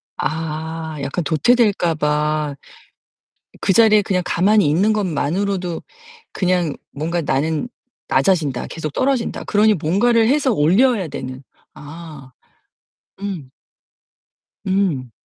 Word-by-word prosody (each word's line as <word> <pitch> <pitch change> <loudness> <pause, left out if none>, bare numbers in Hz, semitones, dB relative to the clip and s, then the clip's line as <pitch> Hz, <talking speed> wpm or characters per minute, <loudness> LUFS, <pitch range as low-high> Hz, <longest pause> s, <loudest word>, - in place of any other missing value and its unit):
아. 160 +1 -4
약간 150 +5 -2
도태될까 180 - +2
봐. 150 -1 0 1.1
그 195 - +2
자리에 215 -1 +6
그냥 190 -2 0
가만히 200 +2 +3
있는 190 +9 +3
것만으로도 185 -1 -1 0.5
그냥 180 -5 0 0.2
뭔가 165 +4 -2
'나는 155 - -1 0.4
낮아진다, 140 -3 +1
계속 155 -2 -5
떨어진다.' 260 - -1
그러니 215 +1 +3
뭔가를 220 +8 +2
해서 275 0 +2
올려야 195 - +3
되는 130 -2 -7 0.3
아. 150 -2 -11 0.9
음 175 -10 -5 1.1
음. 185 -11 0
170 Hz, 220 characters per minute, -20 LUFS, 150-200 Hz, 1.1 s, 자리에